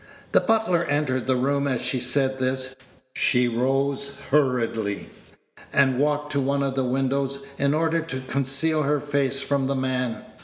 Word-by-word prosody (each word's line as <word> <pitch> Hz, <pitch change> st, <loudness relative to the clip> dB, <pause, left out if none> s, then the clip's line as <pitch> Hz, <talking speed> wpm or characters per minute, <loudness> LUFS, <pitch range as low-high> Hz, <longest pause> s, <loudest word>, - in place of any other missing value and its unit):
The -, -, +5 dB
butler 220 Hz, -6 st, +1 dB
entered 140 Hz, -4 st, -1 dB
the 130 Hz, -, +3 dB
room 140 Hz, +2 st, 0 dB
as 130 Hz, -3 st, 0 dB
she 130 Hz, -, 0 dB
said 130 Hz, +1 st, +1 dB
this; 130 Hz, 0 st, -2 dB, 0.4 s
she 125 Hz, -1 st, +2 dB
rose 135 Hz, +3 st, -1 dB
hurriedly, 115 Hz, -7 st, 0 dB, 0.6 s
and 130 Hz, -2 st, +3 dB
walked 150 Hz, 0 st, 0 dB
to 140 Hz, -, 0 dB
one 140 Hz, +1 st, 0 dB
of 135 Hz, -1 st, -1 dB
the 135 Hz, 0 st, 0 dB
windows, 135 Hz, +2 st, -1 dB
in 140 Hz, +1 st, +2 dB
order 165 Hz, +1 st, +1 dB
to 135 Hz, -5 st, -5 dB
conceal 140 Hz, +4 st, +2 dB
her 145 Hz, 0 st, +1 dB
face 140 Hz, -1 st, -1 dB
from 140 Hz, -1 st, 0 dB
the 140 Hz, -, -1 dB
man. 130 Hz, -2 st, -2 dB
135 Hz, 160 wpm, -24 LUFS, 130-140 Hz, 0.6 s, The